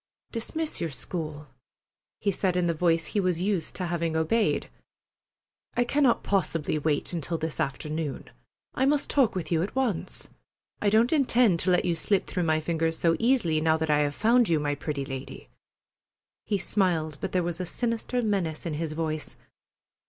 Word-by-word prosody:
"Dismiss 310 +7 -3
your 165 - -1
school," 155 0 -5 0.7
he 200 - +1
said 185 -1 0
in 180 - +2
the 170 - +2
voice 165 0 +2
he 205 - -1
was 180 -3 +1
used 185 -3 -1
to 180 - -2
having 170 -2 -1
obeyed. 185 +8 +1 1.1
"I 245 - +3
cannot 260 0 +2
possibly 165 -5 0
wait 150 +2 0
until 165 0 -2
this 160 0 -4
afternoon. 150 0 -3 0.4
I 265 - +2
must 290 0 +1
talk 260 -9 +3
with 180 -2 -4
you 165 -1 +2
at 195 - -3
once. 210 - -2 0.5
I 205 - +3
don't 225 +6 +4
intend 245 - +4
to 185 - +1
let 180 -1 +3
you 175 - +2
slip 195 +4 +1
through 180 - -2
my 155 -1 +2
fingers 160 0 -1
so 165 -1 +3
easily, 225 -11 +2
now 160 0 +3
that 160 -1 0
I 150 - +4
have 145 -1 0
found 235 0 +4
you, 160 -2 +3
my 145 -1 0
pretty 145 -1 -3
lady." 135 0 -7 1.0
He 205 - +1
smiled, 170 -7 0
but - - -3
there 180 -1 +1
was 170 0 -3
a 180 - -2
sinister 240 +3 -1
menace 185 -8 -1
in 165 - -2
his 155 0 -3
voice. 155 -1 -3
170 Hz, 180 wpm, -27 LUFS, 155-210 Hz, 1.1 s, don't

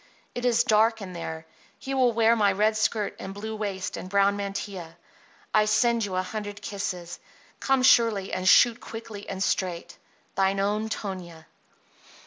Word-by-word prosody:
It 245 - -4
is 240 -1 +3
dark 225 -1 +3
in 185 -2 -8
there. 160 -2 -6 0.3
He 270 - -6
will 255 -2 +3
wear 230 0 +4
my 205 -3 +3
red 215 +3 +2
skirt 215 -1 0
and 195 +1 -7
blue 220 +2 -5
waist 200 -2 -4
and 185 - -7
brown 200 +1 +3
mantilla. 195 -4 -5 0.6
I 215 0 +4
send 230 +1 +2
you 190 -2 -5
a 185 - 0
hundred 205 +1 -6
kisses. 180 -4 -5 0.4
Come 270 -1 +1
surely 225 -6 +4
and 185 0 +1
shoot 240 +3 +6
quickly 225 -3 -8
and 190 0 -2
straight. 180 -4 -2 0.3
THINE 195 0 +1
OWN 210 +2 0
TONIA. 180 -7 -6
205 Hz, 160 wpm, -26 LUFS, 190-225 Hz, 0.6 s, shoot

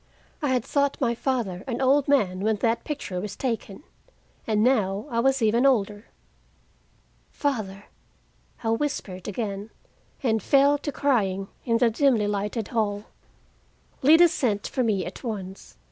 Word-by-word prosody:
I 295 - 0
had 250 -3 +1
thought 280 -1 0
my 240 -3 +1
father 230 -7 -2
an 240 -2 -3
old 270 +1 +3
man 205 -11 +2
when 215 +2 +1
that 230 +2 0
picture 205 - -4
was 205 0 -6
taken, 230 -2 -4 0.6
and 215 -1 +2
now 210 -5 +1
I 230 - 0
was 265 0 +2
even 225 +3 +3
older. 210 -6 +1 1.2
"Father!" 210 -9 -3 0.8
I 225 - 0
whispered 225 -8 -3
again, 205 -1 -4 0.5
and 220 -4 +1
fell 280 +5 +4
to 290 - -4
crying 195 -10 0 0.2
in 230 -2 +2
the 230 0 +3
dimly 235 -3 +2
lighted 205 +2 -2
hall. 205 -3 -1 1.0
Lida 320 +5 +7
sent 210 -9 -1
for 260 - -2
me 210 -6 0
at 180 - -8
once. 195 -5 -7
225 Hz, 145 wpm, -25 LUFS, 205-265 Hz, 1.2 s, Lida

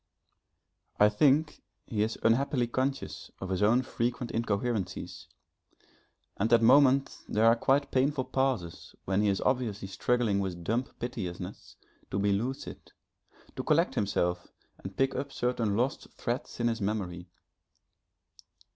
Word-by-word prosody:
I 105 - +7
think 145 +8 +2 0.2
he 110 -4 -2
is 110 +2 0
unhappily 125 +2 +2
conscious 130 +3 -3
of 95 - -5
his 95 0 -1
own 115 +5 +4
frequent 120 0 -2
incoherencies 100 -6 -2 1.1
and 110 +3 0
at 115 -1 +5
moments 135 +2 +4
there 110 +2 +2
are 115 0 +7
quite 140 +4 +1
painful 135 +1 +1
pauses 130 -11 -2
when 95 +1 +1
he 105 - +2
is 95 - 0
obviously 115 -7 -1
struggling 110 +1 +1
with 90 -3 -3
dumb 115 +8 0
piteousness 95 -6 -6 0.3
to - - -2
be 100 0 +2
lucid, 120 +7 -4 0.6
to - - -4
collect - - +2
himself 90 -3 -1 0.3
and 95 0 -9
pick 135 0 +2
up 140 - -4
certain 120 -5 0
lost 125 +4 -1
threads 120 +1 -4
in 120 - +2
his 115 -1 -1
memory. 95 -4 -3
115 Hz, 135 wpm, -29 LUFS, 100-130 Hz, 1.1 s, I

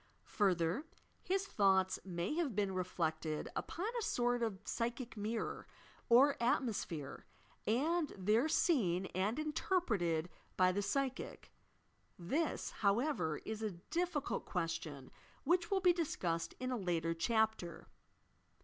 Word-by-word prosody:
Further, 185 - +2 0.3
his 390 +1 0
thoughts 190 - +3
may 175 +4 -2
have 310 - -1
been 200 -2 +1
reflected 160 -4 -2
upon 355 - -3
a 470 +2 -2
sort 245 - +1
of 220 -4 -1
psychic 240 +1 -3
mirror, 215 +2 -3 0.4
or 265 +4 +6
atmosphere, 215 - -1 0.4
and 300 +7 +2
there 215 +10 +3
seen 195 - +2
and 195 +6 0
interpreted 230 - 0 0.3
by 185 0 +5
the 200 +2 0
psychic. 265 +4 -2 0.7
This, 280 - -1
however, 200 - +1
is 220 0 -4
a 215 -3 -2 0.2
difficult 345 -4 0
question 165 -6 -3 0.3
which 350 0 +2
will 390 -1 +2
be 360 -1 +6
discussed 175 - -1
in 255 0 -2
a 250 - 0
later 170 -4 0
chapter. 220 -2 0
220 Hz, 120 wpm, -36 LUFS, 180-285 Hz, 0.7 s, or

